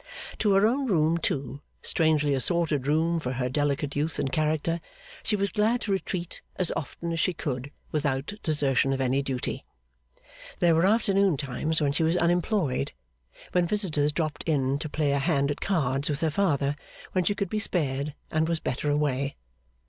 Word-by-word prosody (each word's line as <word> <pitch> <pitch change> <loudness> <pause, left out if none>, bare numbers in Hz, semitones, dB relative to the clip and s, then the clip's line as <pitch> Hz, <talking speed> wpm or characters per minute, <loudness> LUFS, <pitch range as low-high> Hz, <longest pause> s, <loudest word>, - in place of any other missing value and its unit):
To 205 -2 +3
her 195 +2 +5
own 260 +4 +1
room 165 -4 +2
too, 140 -2 -2 0.2
strangely 155 -3 +2
assorted 150 0 +1
room 165 +3 +2
for 125 -4 -3
her 125 0 -1
delicate 145 +1 0
youth 150 +2 -1
and 135 - -1
character, 155 +2 0 0.4
she 215 - 0
was 200 -1 0
glad 225 +4 +2
to 205 - -2
retreat 185 -2 -3
as 185 - 0
often 170 +3 -4
as 165 - -2
she 180 +2 +1
could 140 -4 -3 0.2
without 145 +1 -1
desertion 140 -3 +2
of 135 - -2
any 135 +1 +2
duty. 130 -2 -3 0.9
There 170 -1 +4
were 165 +3 +4
afternoon 200 -5 +3
times 150 +4 -2
when 145 -1 +2
she 145 - -1
was 165 +2 +2
unemployed, 170 - +1 0.6
when 180 -1 +2
visitors 165 -8 +2
dropped 155 -1 -2
in 140 -2 +1
to 155 - -4
play 150 -1 0
a 140 - +2
hand 140 -1 +1
at 145 - -5
cards 140 -7 +1
with 145 0 -2
her 160 -1 +1
father, 145 -5 +1 0.4
when 185 - +1
she 200 +4 +1
could 200 -3 -3
be 215 - 0
spared 145 -7 -1 0.2
and 160 +1 +1
was 165 -1 0
better 140 +2 -2
away. 140 -2 0
155 Hz, 180 wpm, -27 LUFS, 140-175 Hz, 0.9 s, her